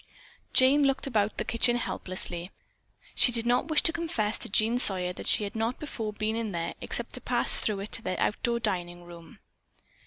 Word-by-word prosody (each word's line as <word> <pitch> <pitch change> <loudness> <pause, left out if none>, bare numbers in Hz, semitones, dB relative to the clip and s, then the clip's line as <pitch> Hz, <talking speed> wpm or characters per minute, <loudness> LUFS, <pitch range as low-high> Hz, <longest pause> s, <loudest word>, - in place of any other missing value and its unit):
Jane 265 +3 +4
looked 270 0 0
about 215 -6 -1
the - - -3
kitchen 240 +1 +1
helplessly. 185 -6 -4 0.6
She 245 - +4
did 230 -1 +3
not 245 +4 +1
wish 315 -2 +2
to 325 - +2
confess 280 -12 -2
to - - -2
Jean 220 +4 +2
Sawyer 180 -6 +4
that - - -9
she - - +3
had 200 - -6
not 225 +3 -2
before 225 -8 -5
been 215 +1 -3
in 225 -3 -4
there 170 0 -4
except - - -5
to - - -6
pass - - +4
through 205 -2 -2
it 205 - -8
to - - +4
their 185 -4 -4
outdoor 235 +2 -1
dining 175 -5 -3
room. 170 -1 -14
220 Hz, 195 wpm, -27 LUFS, 185-245 Hz, 0.6 s, Jane